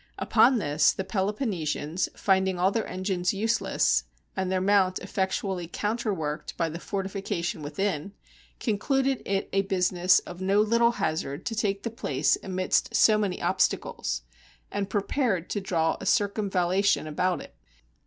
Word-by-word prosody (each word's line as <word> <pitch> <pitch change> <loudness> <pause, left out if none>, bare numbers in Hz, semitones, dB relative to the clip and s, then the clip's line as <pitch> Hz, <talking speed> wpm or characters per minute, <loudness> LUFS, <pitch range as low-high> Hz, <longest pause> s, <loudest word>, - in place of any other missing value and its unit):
Upon 260 - +4
this, 150 -5 +3
the 190 - -3
Peloponnesians, 190 - -2
finding 190 -1 +2
all 185 +2 +3
their 225 +1 -1
engines 185 0 -1
useless, 225 +4 +1 0.3
and 190 -1 -1
their 190 - +1
mount 190 -1 +3
effectually 190 -1 -2
counterworked 200 -7 -3
by 165 -1 0
the 165 +2 -6
forti 195 +1 -3
fication 190 -4 -3
within, 160 +4 -2 0.5
concluded 265 +4 0
it 195 0 0
a 195 - +3
business 185 -2 +3
of 175 +1 -5
no 195 +2 +2
little 235 +2 +3
hazard 155 -4 -2
to 230 - -2
take 200 -2 -1
the 230 - -3
place 145 - +1
amidst 185 -1 0
so 215 -1 +5
many 200 -4 -2
obstacles, - - 0 0.5
and 200 -1 -2
pre 205 -2 0
pared 205 - -1
to 205 - -1
draw 165 -4 0
a 195 - -5
circumvallation 200 -4 +1
about 170 +2 0
it. - - -11
190 Hz, 145 wpm, -27 LUFS, 175-205 Hz, 0.5 s, so